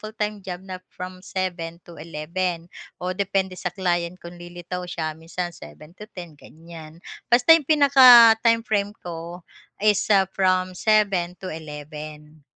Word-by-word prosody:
full-time 215 -1 -5
job 180 -2 -6
na 185 -1 -8
from 185 0 -9
7:00-11:00, 170 -1 -5 0.3
o 180 +1 -4
depende 190 -1 -1
sa 180 - -3
client 175 -1 -2
kung 175 0 -11
lilitaw 175 +1 -7
siya 160 -3 -4
minsan 170 +2 -6
7:00-10:00 170 - -12
gan'yan. 160 +1 -13 0.3
Basta 245 +7 +6
iyong 305 -5 0
pinaka 255 -6 +8
time 230 -1 +3
frame 205 -1 0
ko 170 +1 -8 0.4
is 210 0 +2
ah 195 -2 +4
from 185 -1 +1
7:00-11:00. 155 -7 -3
180 Hz, 120 wpm, -23 LUFS, 165-200 Hz, 0.4 s, pinaka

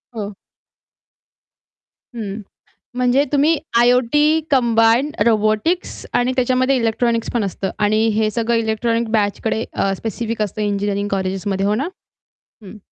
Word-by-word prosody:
हो. 205 -2 -5 1.8
हं. 215 -2 -5 0.6
म्हणजे 250 +3 +3
तुम्ही 295 +3 +3 0.2
आय-ओ-टी 255 +6 +3
कंबाईन, 235 +1 +3 0.2
रोबोटिक्स 220 - 0
आणि 250 +1 +1
त्याच्यामध्ये 255 +1 +2
इलेक्ट्रॉनिक्स 230 -1 0
पण 235 - 0
असतं 195 0 -3
आणि 215 +2 +2
हे 215 0 +2
सगळं 235 +1 0
इलेक्ट्रॉनिक 230 +1 -1
बॅचकडे 220 +1 0
अ, 195 - 0
स्पेसिफिक 225 +1 -4
असतं 210 +1 -2
इंजिनिअरिंग 205 0 -1
कॉलेजेसमध्ये, 195 0 -1
हो 205 +1 +2
ना? 275 +9 -1 0.8
हं. 205 +2 -11
225 Hz, 115 wpm, -19 LUFS, 210-245 Hz, 1.8 s, म्हणजे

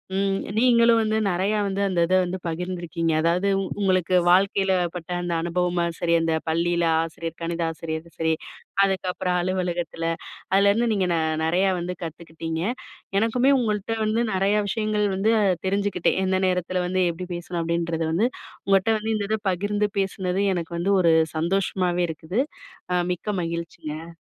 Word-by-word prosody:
ம் 195 0 +1 0.2
நீங்களும் 235 -1 +5
வந்து 215 0 +1
நெறையா 195 +3 +1
வந்து 195 0 -2
அந்த 185 -3 0
இதை 185 - +3
வந்து 180 +1 -3
பகிர்ந்துருக்கீங்க. 170 -1 -2
அதாவது 175 +4 +2 0.3
உங்களுக்கு 185 -2 +2
வாழ்க்கையில 195 +1 +3 0.2
பட்ட 175 -1 -7
அந்த 175 -1 -2
அனுபவமா 175 +1 0 0.2
சரி, 170 -1 +1
அந்த 165 0 +1
பள்ளியில 170 +1 +1 0.2
ஆசிரியர் 165 0 -6
கணித 170 0 -2
ஆசிரியருது 160 0 -5
சரி, 160 0 +1 0.5
அதுக்கப்பறம் 185 -1 -1
அலுவலகத்தில. 175 -2 -2 0.5
அதுலேருந்து 200 +4 +4
நீங்க 190 -3 +1
நெ 165 - +1 0.3
நெறையா 180 +4 +2
வந்து 180 +1 -4
கத்துக்கிட்டீங்க. 165 0 -5 0.6
எனக்குமே 245 +5 +3
உங்கள்ட்ட 215 -1 -1
வந்து 220 +2 +1
நெறைய 195 +2 +2
விஷயங்கள் 215 0 0
வந்து 205 +4 +2
அ - - +3 0.2
தெரிஞ்சுக்கிட்டேன். 200 -2 +1
எந்த 190 0 +1
நேரத்தில 180 0 0
வந்து 185 +1 +1
எப்படி 180 +2 -7
பேசணும் 175 0 -4
அப்படின்றது 170 0 -1
வந்து. 195 +9 +2 0.4
உங்கள்ட்ட 195 +3 +3
வந்து 220 +1 -2
இந்த 205 -1 -1
இத 220 - +1
பகிர்ந்து 205 +3 0
பேசினது 190 0 -1
எனக்கு 170 -1 -4
வந்து 195 +4 +1
ஒரு 165 -2 +4 0.2
சந்தோஷமாவே 180 +1 0
இருக்குது. 160 +8 -2 0.5
அ - - +3 0.2
மிக்க 205 +4 -4
மகிழ்ச்சிங்க. 165 -1 -6
180 Hz, 145 wpm, -24 LUFS, 170-200 Hz, 0.6 s, நீங்களும்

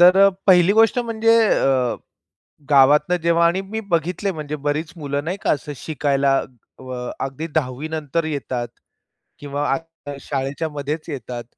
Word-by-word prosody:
तर 185 +3 +7 0.2
पहिली 180 -1 +6
गोष्ट 225 +3 +4
म्हणजे 230 -1 +2
अ, 130 -3 +2 0.7
गावातनं 145 +5 +5
जेव्हा 170 0 +3
आणि 185 +3 0
मी 210 +3 -5
बघितले 175 +4 0
म्हणजे 150 -2 -5
बरीच 150 +3 -2
मुलं 145 -2 -3
नाही 180 +4 -2
का, - - +1
असं 145 0 -3
शिकायला 140 -2 +1 0.4
अ, 125 -1 -6
अगदी 135 +4 -5
10वी 140 0 -1
नंतर 160 +1 -2
येतात 130 -5 -3 0.7
किंवा 145 0 -3
आत्ता 165 0 -6
शाळेच्यामध्येच 145 +3 -4
येतात, 125 -4 -6
150 Hz, 135 wpm, -21 LUFS, 140-170 Hz, 0.7 s, तर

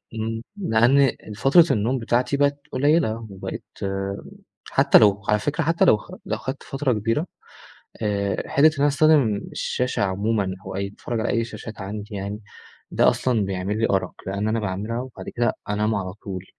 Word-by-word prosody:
إمم، 115 0 -3 0.2
لأن 125 - +3
ال 120 -5 -1
فترة 145 +9 +6
النوم 125 +2 +1
بتاعتي 125 +4 +1
بقت 145 0 +2
قليلة، 130 -6 +1
وبقيت 95 -1 -6 1.1
حتى - - +6
لو 105 -1 +4
على 105 - +4
فكرة 145 +8 -1
حتى 165 +2 +2
لو 110 - +6
خ - - -14
لو 110 - -2
خدت 130 +5 -6
فترة 135 -1 -1
كبيرة، 115 - -1 0.7
آآ 100 -3 -1
حِتّة 140 - +4
إن 155 - +2
أنا 145 - +4
استخدم 145 -6 +4 0.2
الشاشة 125 -3 -1
عمومًا، 100 0 0
وأي 95 +1 -3
أتفرج 115 +3 -5
على 110 - -1
أي 115 -2 +1
شاشات 110 -2 -8
عندي 105 +1 -6
يعني، 100 +1 -4 0.5
ده - - +5
أصلًا 115 -5 0
بيعمل 95 +2 -2
لي 115 - +2
أَرَق، 95 -1 0
لأن 100 +2 -2
أنا 110 +1 +1
باعملها 105 +3 -3
وبعد 130 -1 -8
كده 120 0 0 0.2
أنام 105 +1 +1
على 95 -2 -3
طول، 95 -2 -7
110 Hz, 170 wpm, -23 LUFS, 100-130 Hz, 1.1 s, فترة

